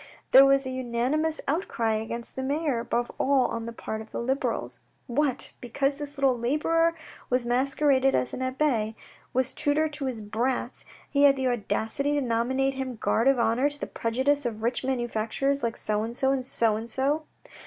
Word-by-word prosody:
There 270 +1 +9
was 275 0 +3
a 260 - -3
unanimous 260 +6 -1
out 320 +7 0
cry 225 -1 0
against 225 +2 -5
the 265 - -3
mayor, 280 -1 0
above 235 +1 -2
all 270 -2 +3
on 230 0 -4
the - - -4
part 220 -1 -5
of 220 - -11
the - - -4
Liberals. 265 +3 -2 0.3
What, 270 +1 0
because 275 +4 -1
this 290 0 -7
little 270 -2 +3
labourer, 315 +7 +1 0.3
who 250 - +3
masqueraded 270 +2 +2
as 125 -1 0
an - - -4
abbe, 255 -5 0 0.4
was 260 0 0
tutor 300 +1 +1
to 295 -2 -5
his 255 -4 -3
brats, 235 +4 -2 0.2
he 285 0 +3
had 275 -1 +6
the 265 -1 -1
audacity 245 +4 -1
to 290 - +1
nominate 260 +3 0
him 260 -2 -4
guard 225 +2 +1
of 270 -1 +4
honour 235 +4 +2
to 290 0 -4
the - - -3
prejudice 265 +5 0
of 220 -3 -4
rich 240 +3 0
manufacturers 255 +2 -1
like 230 -1 -2
so 210 0 -1
and 230 +2 -4
so 265 +1 +2
and 265 -2 0
so 225 -4 +3
and 225 +2 -5
so 285 +6 +1
260 Hz, 190 wpm, -26 LUFS, 235-280 Hz, 0.4 s, There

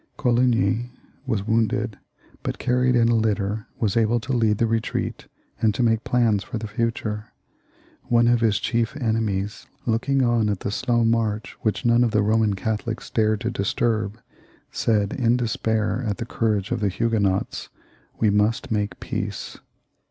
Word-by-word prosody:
Coligny 120 -1 +2 0.4
was 110 -6 -1
wounded, 115 0 0 0.4
but, - - -3
carried 125 0 +2
in 115 -1 +4
a 120 - +3
litter, 105 -1 0
was 105 -4 0
able 115 +1 +3
to 130 +3 -3
lead 110 -3 +2
the 115 - +2
retreat 115 0 -2 0.3
and 110 -2 +3
to 125 - +1
make 115 -1 +2
plans 115 -5 +2
for 125 - -5
the 110 - -5
future. 110 -1 -2 0.8
One 120 0 +3
of 120 -1 +3
his 110 -4 +3
chief 115 +4 -1
enemies, 110 -5 -1 0.2
looking 130 +4 +1
on 120 -3 +2
at 100 -3 -2
the 100 - -2
slow 120 +1 +1
march 110 -2 0
which 110 +3 -1
none 120 +1 +5
of 120 - +2
the 105 -1 +2
Boman 110 -1 +2
Catholics 110 +2 -3
dared 110 -2 +1
to - - -1
disturb, 110 +1 -1 0.5
said, 105 -3 +1
in 120 -2 +2
despair 110 -1 0
at 105 - -1
.the 115 - -4
courage 105 -4 -1
of - - 0
the 105 -2 +1
Huguenots, 100 -2 0 0.2
" - - -34
We 110 -2 +3
must 105 +3 +1
make 105 -1 -1
peace." - - -5
110 Hz, 165 wpm, -23 LUFS, 105-120 Hz, 0.8 s, none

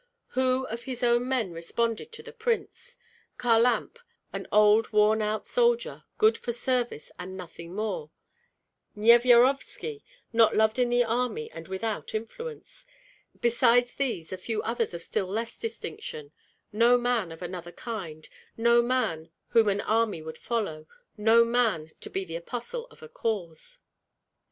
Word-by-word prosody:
Who 260 0 +1
of 235 +1 -6
his 255 -2 -5
own 240 +1 +3
men 240 -8 0
responded 230 - -2
to 450 0 -9
the 470 0 -11
prince? 480 +1 -3 0.4
Kharlamp, 240 - +2 0.3
an - - -5
old, 210 +1 +5
worn 215 +1 +4
out 215 0 -1
soldier, 480 0 +1
good 440 +1 +4
for 240 - -3
service 240 - -2
and 185 +1 -7
nothing 175 -1 -9
more; 195 -8 -3 0.9
Nyevyarovski, 245 - +4 0.3
not 225 -1 +5
loved 220 +2 +3
in 245 -1 +3
the 245 0 +3
army 250 - -2
and - - -9
without 210 +4 -4
influence; 460 - -7 0.5
besides 240 +1 +3
these 230 -12 -3
a 185 - -5
few 220 +3 -3
others 230 -5 -1
of 170 - -6
still 190 - -2
less 225 +4 -4
distinction; 160 -9 -6 0.4
no 235 +3 +5
man 240 -7 0
of 165 +2 -9
another 175 -1 -6
kind, 175 -9 -7 0.3
no 235 +1 +5
man 235 -10 -1 0.2
whom 225 -2 +4
an 200 0 0
army 215 -6 0
would 160 0 -8
follow, 205 -10 -3 0.3
no 225 +2 +5
man 225 -10 +1
to - - -7
be 190 0 -3
the 165 -2 -7
apostle 245 - -6
of - - -18
a - - -8
cause. 210 - -4
230 Hz, 145 wpm, -27 LUFS, 195-245 Hz, 0.9 s, old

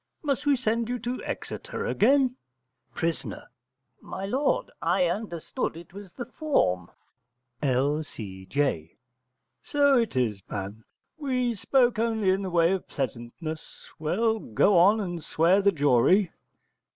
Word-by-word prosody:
Must 290 -1 -1
we 285 - +5
send 230 -2 -1
you 250 - -1
to 245 +2 -4
Exeter - - -5
again? 260 +2 +3 0.6
Pris. 165 0 -1 0.8
My 190 - -6
lord, 265 +8 0
I 180 +2 +2
understood 175 -3 -3
it 170 +1 -12
was 200 -2 -10
the 245 - -6
form. 95 - 0 0.7
L.C.J. 130 - -1 0.6
So 285 -3 +3
it 230 - -1
is, 110 -6 0
man: 100 +2 -5 0.4
we 250 -4 0
spoke 240 +2 +2
only 220 -4 +2
in 190 +1 +1
the 190 - -3
way 170 0 +3
of 190 -1 -2
pleasantness. 135 +5 -6
Well, 220 +8 +1
go 190 - +2
on 195 +6 +6
and 175 -5 -4
swear 175 +7 +3
the 200 0 +4
jury. 150 - +3
185 Hz, 125 wpm, -27 LUFS, 145-235 Hz, 0.8 s, on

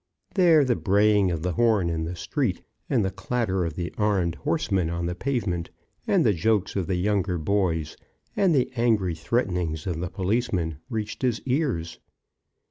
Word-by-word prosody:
There 170 -6 +5
the 125 -2 +2
braying 105 -1 +3
of 85 -2 -3
the 90 - 0
horn 110 -2 +2
in 80 -1 -2
the 85 +2 -4
street, - - -2 0.3
and 115 -7 +2
the 95 - -1
clatter 105 -8 -1
of 80 -2 -4
the 85 -1 -4
armed 100 -5 +1
horsemen 95 - -1
on 85 0 -2
the 85 - -1
pavement, 95 -6 -2 0.4
and 185 -7 +3
the 110 - +4
jokes 100 +2 0
of 95 -4 -1
the 95 - 0
young 100 +2 +1
boys, 90 -3 -1 0.4
and 185 -5 +3
the 130 -2 +1
angry 110 -7 +2
threatenings 85 -4 -1
of 85 -4 -2
the 90 0 -3
policemen, 95 - -1
reached 110 -3 -4
his 125 -4 +1
ears. 125 - -1
95 Hz, 170 wpm, -25 LUFS, 85-115 Hz, 0.4 s, There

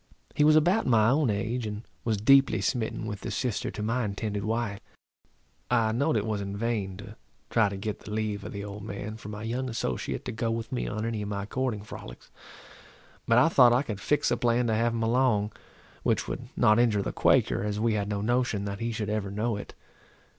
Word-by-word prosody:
He 150 - +2
was 155 +1 +6
about 175 +7 +3
my 115 -2 +5
own 145 -2 +2
age, 110 +3 -1
and 105 +1 -5 0.2
was 110 -2 0
deeply 135 +2 +5
smitten 110 +2 -1
with 105 -2 -4
the - - -4
sister 125 -5 -2
to 105 - -5
my 120 +3 0
intended 105 0 -3
wife. 110 -2 -1 0.9
I 115 -3 +3
know'd 140 +4 +1
it 105 - -1
was 105 -2 -2
in 100 0 -4
vain 105 -4 -2
to 100 +2 -10 0.4
try 110 -3 +4
to 100 - -5
get 105 +1 -4
the - - -11
leave 105 -1 -2
of - - -6
the 100 0 -5
old 105 0 -7
man 105 +1 -6
for 105 - -9
my 105 +1 -6
young 125 +3 -2
associate 115 - -3
to - - -3
go 115 +1 -2
with 115 0 -3
me 125 - -2
on 110 +1 -3
any 115 -2 -2
of 105 - -4
my 100 -1 -3
courting 120 -2 -2
frolics; - - -10 1.0
but 115 - +4
I 125 - +6
thought 125 -7 +6
I 125 +3 +3
could 105 -7 -5
fix 145 +8 +1
a - - +2
plan 120 0 +2
to 115 - +1
have 115 +2 +2
him 115 0 -2
along, 115 -3 +2 0.5
which - - 0
would - - -5
not 105 +1 +5
injure 110 -4 +3
the - - -3
Quaker, - - +3
as 105 0 -2
we 115 0 +2
had 100 -1 -1
no 100 -1 -2
notion 120 -2 0
that 100 0 -4
he 115 0 -2
should 110 -2 -3
ever 105 -2 -1
know 105 +3 -1
it. 100 - -8
110 Hz, 225 wpm, -28 LUFS, 105-120 Hz, 1.0 s, was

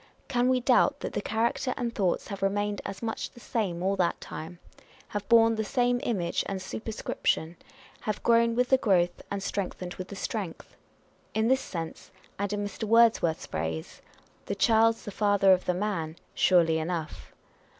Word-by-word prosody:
Can 250 -2 +2
we 255 -1 +3
doubt 265 +3 +3
that - - -4
the - - -1
character 230 +4 0
and 240 -2 -2
thoughts 190 -2 0
have 200 -1 -6
remained 205 +1 0
as 195 +3 -7
much 225 -1 -3
the - - -16
same 190 -8 -2
all 195 +1 +1
that 175 -2 +1
time; 165 +3 -8 0.5
have 205 0 -5
borne 230 -1 +6
the 220 -1 -1
same 245 +3 +1
image 180 -7 -1
and 195 -1 -3
super 215 +4 -6
scription; 165 -5 -1 0.4
have 215 -2 -4
grown 230 0 +4
with 250 +1 +1
the 265 - +5
growth, 180 -7 +2
and 200 -1 -3
strengthened 180 -3 -3
with 185 - -7
the 200 - -8
strength? 195 -4 -5 0.6
In 220 +1 +2
this 265 0 +3
sense, 165 -3 -6 0.3
and 200 0 -1
in 205 0 -1
Mr. 205 +2 -5
Words 230 +1 +5
worth's 160 -2 -1
phrase, 80 0 -4 0.2
" - - -33
the 200 - -2
child's 225 +2 +3
the 205 - -5
father 200 -2 +4
of 185 - 0
the 180 - +1
man 180 -5 -2
" - - -37
surely 165 -3 +4
enough. 160 -1 -4
205 Hz, 185 wpm, -28 LUFS, 180-230 Hz, 0.6 s, borne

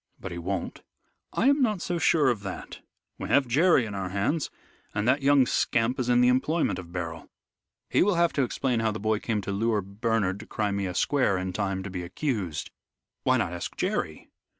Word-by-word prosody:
"But 95 - -6
he 85 - -5
won't." 90 +1 -4 0.5
"I 230 - +1
am 280 +1 +4
not 215 -6 +2
so 175 0 -2
sure 155 -4 +4
of 115 -4 -1
that. 95 -2 -7 0.4
We - - -5
have 140 -2 +4
Jerry 145 +1 +4
in 105 - -6
our 95 -2 -3
hands, 105 - 0 0.5
and 105 +2 0
that 135 +3 +3
young 140 -1 +5
scamp 120 +1 +1
is 125 -1 -1
in 120 0 +5
the 125 - +5
employment 140 - +1
of 85 -2 -10
Beryl. 85 -2 -5 0.6
He - - +2
will 200 0 +3
have 170 0 +3
to 140 - +1
explain 125 -1 0
how 110 0 +1
the 110 - -5
boy 110 0 +1
came 110 -3 -1
to 100 - -4
lure 105 +1 +1
Bernard 100 -1 -1
to 110 - -10
Crimea 100 -3 -2
Square 130 -7 +2
in 95 0 -3
time 95 -2 -2
to 95 - -6
be 90 -1 -4
accused." 90 - -3 0.5
"Why - - +3
not - - -1
ask - - -6
Jerry?" - - -2
110 Hz, 205 wpm, -27 LUFS, 95-135 Hz, 0.6 s, young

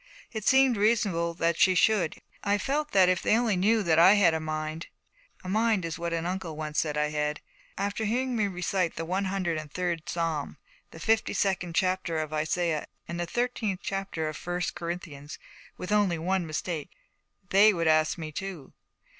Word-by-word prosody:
It 220 -2 -4
seemed 265 -3 +5
reasonable 200 -6 +1
that 170 0 0
she 185 - +5
should, 180 -3 +3
and - - -18 0.2
yet 200 - 0
I - - +1
felt 290 +8 -1
that 190 -2 +5
if 185 -1 +2
they 220 - +3
only 230 -4 +1
knew 210 +4 +2
that 165 -3 +3
I 185 +5 +8
had 195 -5 +4
a 160 - 0
mind, 155 +1 -4 0.6
a - - -8
mind 215 0 +2
was 165 0 -4
what 170 0 -3
an 165 0 -2
uncle 180 -3 -4
once 150 -1 -2
said 150 -2 -1
I 150 0 +1
had, 150 0 -2 0.4
after 200 +2 -2
hearing 250 +3 0
me 215 -3 +1
recite 180 -1 -1
the 165 - -4
one 190 +4 -1
hundred 185 -4 -1
and 150 -2 -9
third 175 -2 -3
Psalm, 165 -4 -2 0.3
the 160 - -12
fifty 225 +4 +1
second 180 -4 -1
chapter 185 -3 0
of 155 -1 -3
Isaiah, 155 0 -1 0.2
and 170 0 -5
the 175 - -2
thirteenth 225 -3 -2
chapter 195 -5 -3
of 155 - -4
First 175 +2 -3
Corinthians, 170 -4 -6 0.4
with 180 - -6
only 205 -5 +3
one 180 +1 -1
mistake, 155 0 -4 0.6
they 205 +3 +7
would 170 -4 -1
ask 155 +1 +3
me 160 -2 -6
too. 180 -4 -7
175 Hz, 195 wpm, -28 LUFS, 160-200 Hz, 0.6 s, I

